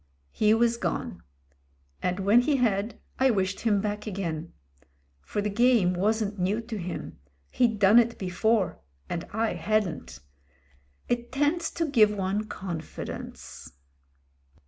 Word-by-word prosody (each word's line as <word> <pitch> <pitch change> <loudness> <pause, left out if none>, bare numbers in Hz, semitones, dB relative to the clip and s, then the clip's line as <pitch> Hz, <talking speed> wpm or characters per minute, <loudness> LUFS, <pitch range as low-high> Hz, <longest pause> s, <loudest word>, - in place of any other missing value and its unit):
He 215 0 +3
was 235 0 +2
gone; - - -3 0.8
and 180 +2 -1
when 205 +5 +5
he 290 +3 +1
had, 220 -3 0 0.2
I 265 0 +5
wished 195 -4 0
him 210 -4 +2
back 210 +1 -3
again. 170 -5 -4 0.7
For 205 - -3
the 210 - 0
game 230 -4 +4
wasn't 205 +2 0
new 190 +5 +1
to 225 -2 -6
him 175 - -6
— 70 0 -40
he'd 235 -4 +2
done 205 +3 +7
it 235 0 +1
before; 195 +1 0 0.3
and 170 -1 -3
I 220 +1 0
hadn't. 195 - -1 0.9
It 240 0 -2
tends 295 +5 +1
to 335 - 0
give 235 -8 +5
one 200 +2 -1
confi 170 -6 -6
dence. - - -9
210 Hz, 140 wpm, -27 LUFS, 190-235 Hz, 0.9 s, done